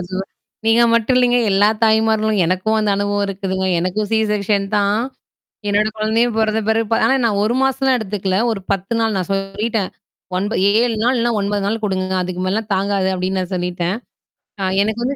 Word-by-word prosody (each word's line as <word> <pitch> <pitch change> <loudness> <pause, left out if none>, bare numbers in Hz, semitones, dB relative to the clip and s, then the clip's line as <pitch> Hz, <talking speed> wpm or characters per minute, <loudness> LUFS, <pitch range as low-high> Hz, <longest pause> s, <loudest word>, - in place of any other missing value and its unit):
Super, 175 - -5
super. 190 +1 -4 0.4
நீங்க 230 +1 +5
மட்டும் 235 +3 +2
இல்லேங்க. 245 -1 +3
எல்லா 205 +2 +4 0.2
தாய்மார்களும் 220 -1 +2
எனக்கும் 185 +5 0
அந்த 210 -1 +1
அனுபவம் 205 0 0
இருக்குதுங்க. 190 -1 -3
எனக்கும் 200 +4 -2
சிசெர்க்ஷன் 210 -2 +1
தான். 205 +2 +2 0.7
என்னோட 210 +1 +2
குழந்தையும் 220 +2 +1
பிறந்த 220 0 +1
பிறகு 225 0 +1
ஆனா 265 - +3
நான் 205 -3 +1
1 220 +3 +1
மாசம்லாம் 270 -1 +2
எடுத்துக்கல. 195 -2 -2
ஒரு 195 -3 -4
10 195 +2 -2
நாள் 225 -2 +1
நான் 180 - -3
சொல்லிட்டேன். 195 +1 -2 0.5
ஒன்ப 205 +4 -1
ஏ - - +5
7 235 -2 0
நாள் 250 +1 +2
இல்லனா, 235 0 +1
9 200 0 -1
நாள் 220 +2 -2
கொடுங்க. 190 -2 -1
அதுக்கு 180 0 -5
மேலலாம் 215 +3 -2
தாங்காது, 195 0 0
அப்பிடின்னு 185 +1 -1
நான் 185 +1 -5
சொல்லிட்டேன். 180 +1 -2 0.7
ஆ - - 0 0.2
எனக்கு 220 +3 -2
வந்து 275 +3 -1
210 Hz, 180 wpm, -18 LUFS, 195-220 Hz, 0.7 s, நீங்க